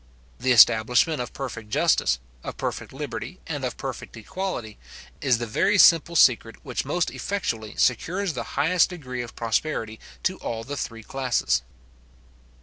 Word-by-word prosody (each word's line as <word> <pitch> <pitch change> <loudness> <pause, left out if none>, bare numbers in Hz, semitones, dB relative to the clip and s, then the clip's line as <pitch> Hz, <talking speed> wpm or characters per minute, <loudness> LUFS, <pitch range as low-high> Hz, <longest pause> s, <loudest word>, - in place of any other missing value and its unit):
The 130 +1 +1
establishment 125 +5 +5
of 120 - -5
perfect 115 -5 -6
justice, 65 -9 +2 0.3
of - - -6
perfect - - -4
liberty, - - -6
and - - -4
of - - -3
perfect - - -6
equality, 115 - -5 0.4
is 125 -3 +3
the 120 - -3
very 200 - +2
simple 170 -2 +6
secret 115 -6 +4
which 125 -1 -3
most 175 +6 0
effectually 115 - -3
secures 175 - +1
the 125 - -3 0.2
highest 175 +3 +3
degree 130 -9 -6
of 120 -2 -8
prosperity 115 -1 -2 0.2
to 185 0 0
all 115 -1 -4
the 140 +5 -5
three 115 -5 -5
classes. 120 - 0
125 Hz, 145 wpm, -25 LUFS, 115-165 Hz, 0.4 s, simple